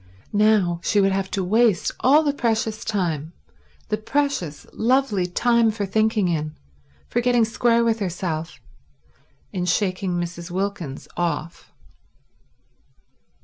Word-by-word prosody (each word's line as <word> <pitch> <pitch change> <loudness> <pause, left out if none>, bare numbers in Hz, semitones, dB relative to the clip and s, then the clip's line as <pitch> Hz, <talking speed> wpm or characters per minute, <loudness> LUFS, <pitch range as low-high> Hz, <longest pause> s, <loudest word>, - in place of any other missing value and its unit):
Now 205 -5 +3
she 210 - +2
would 195 0 +3
have 190 0 -1
to 195 - -2
waste 220 +1 +2
all 290 +5 +5
the 290 -2 +1
precious 225 -4 -1
time, 165 -7 -2 0.6
the 215 - 0
precious, 220 - -2
lovely 225 -6 +1
time 235 +5 +3
for 215 -1 -2
thinking 215 0 +1
in, 155 -3 -2 0.5
for - - 0
getting 240 -2 +3
square 235 +1 +2
with 230 -1 +1
herself, 170 -4 -3 0.9
in 180 -2 -2
shaking 185 +1 0
Mrs. 175 0 -4
Wilkins 185 -6 -4
off. 170 -1 -3
200 Hz, 120 wpm, -23 LUFS, 175-225 Hz, 0.9 s, all